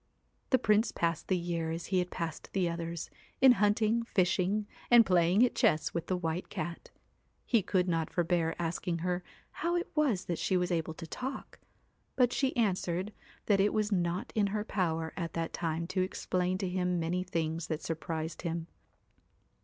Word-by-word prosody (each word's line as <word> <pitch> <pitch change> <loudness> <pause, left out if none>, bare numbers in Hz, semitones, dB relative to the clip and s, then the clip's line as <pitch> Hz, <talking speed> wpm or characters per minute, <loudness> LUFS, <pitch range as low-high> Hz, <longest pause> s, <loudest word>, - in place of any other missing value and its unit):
The 260 - +5
Prince 215 -1 +3
passed 165 -2 -1
the 185 - +2
year 170 -2 -2
as 165 +1 -4
he 185 -1 +1
had 180 0 -1
passed 165 -3 -5
the 185 -3 +2
others, 170 -1 -4 0.3
in 265 -1 +8
hunting, 215 +1 +3
fishing, 195 -1 +1 0.2
and 240 -2 +8
playing 180 +4 +4
at 245 - -1
chess 155 - +2
with 170 - -3
the 185 - 0
White 165 0 -3
Cat. 170 +2 -5 0.6
He 230 -4 +3
could 185 -1 +1
not 165 -2 0
forbear 170 -1 +1
asking 170 +1 -2
her 180 0 0 0.4
how 345 +1 +1
it 350 +1 -2
was 280 - +1
that 170 - -2
she 185 - +1
was 180 0 0
able 160 -2 -1
to 165 - -7
talk; 260 - -6 0.6
but 245 -2 +3
she 265 -2 0
answered 190 -2 0 0.3
that 200 -2 +3
it 205 +2 +3
was 215 0 0
not 175 -1 -1
in 210 -2 +3
her 210 +1 -1
power 165 -6 -1
at 170 -3 -4
that 165 0 -3
time 165 0 -2
to 185 - 0
explain 185 0 -1
to 190 -1 -2
him 180 -1 0
many 170 +2 0
things 165 -2 -2
that 155 -1 -3
sur 165 - -1
prised 160 0 -4
him. 170 -1 -3
180 Hz, 185 wpm, -31 LUFS, 165-205 Hz, 0.6 s, in